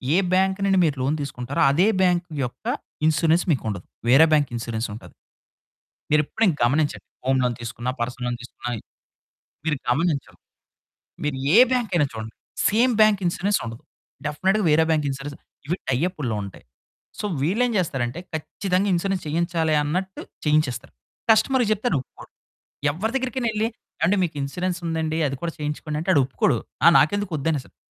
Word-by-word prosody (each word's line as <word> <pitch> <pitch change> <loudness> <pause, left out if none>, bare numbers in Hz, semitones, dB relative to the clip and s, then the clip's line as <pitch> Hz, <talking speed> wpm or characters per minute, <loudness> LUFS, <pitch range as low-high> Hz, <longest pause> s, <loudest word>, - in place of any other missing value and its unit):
ఏ - - +5 0.2
bank 190 +1 +2
నుండి 195 -1 +3
మీరు 150 -3 +1
loan 135 +4 +1
తీసుకుంటారో, 140 +2 -3
అదే 175 +8 +3
బ్యాంకు 175 -1 +2 0.2
యొక్క 125 - -10 0.4
ఇన్సూరెన్స్ 160 +2 +3
మీకు 140 - 0
ఉండదు. 100 -4 -5 0.2
వేరే 135 +6 +8
బ్యాంక్ 145 -3 +3
ఇన్సూరెన్స్ 115 0 -3
ఉంటది. 110 - -11 1.0
మీరెప్పుడైన 155 +6 +2
గమనించండి. 145 +5 +1 0.2
హోమ్ 130 0 +2
లోన్ 125 -1 0
తీసుకున్న, 120 +1 -4
పర్సన్‌లో 125 +1 -2
తీసుకున్న, 125 - -9 1.0
మీరు 150 -2 +1
గమనించరు. 150 +2 0 0.9
మీరు 150 -2 -1 0.2
ఏ - - +9
బ్యాంక్ 245 -4 0
అయినా 155 -4 +3
చూడండి. 110 0 -7 0.3
సేమ్ 240 +4 +3
బ్యాంక్ 215 -2 +5
ఇన్సూరెన్స్ 195 +4 +1
ఉండదు. 115 0 -8 0.4
డెఫినెట్‌గా 190 +7 +1
వేరే 160 +2 +5
బ్యాంక్ 155 -2 +2
ఇన్సూరెన్స్ 140 +1 -6 0.3
ఇవి 170 +5 0
టై 125 - +2
అప్పుల్లో 135 - -3
ఉంటాయి. 100 - -11 0.6
సో, - - -4 0.2
వీళ్ళేం 220 - +2
చేస్తారంటే, 135 -6 -1 0.2
ఖచ్చితంగా 185 +5 -1
ఇన్సూరెన్స్ 190 +1 -1
చేయించాలి 165 0 0
అన్నట్టు, 185 +6 -3 0.3
చేయించేస్తారు. 140 -4 +1 0.4
కస్టమర్ 245 +4 +3
చెప్తే 215 +3 -2
ఆయనొప్పుకోరు. 135 -5 -4 0.6
ఎవ్వరి 195 +10 -2
దగ్గరికనెళ్ళి 240 -4 -1 0.4
ఏవండీ 185 +5 +3
మీకు 165 -3 -4
ఇన్సూరెన్స్ 180 +6 -2
ఉందండి, 160 -1 -1
అది 140 -1 -3
కూడా 170 -1 -2
చేయించుకోండంటే 150 +2 -4
ఆడొప్పుకోడు. 135 -3 +2 0.3
ఆ - - +8
నాకెందుకు 185 +7 +1
వద్దనేస్తాడు. 145 -2 -2
155 Hz, 140 wpm, -23 LUFS, 135-190 Hz, 1.0 s, ఏ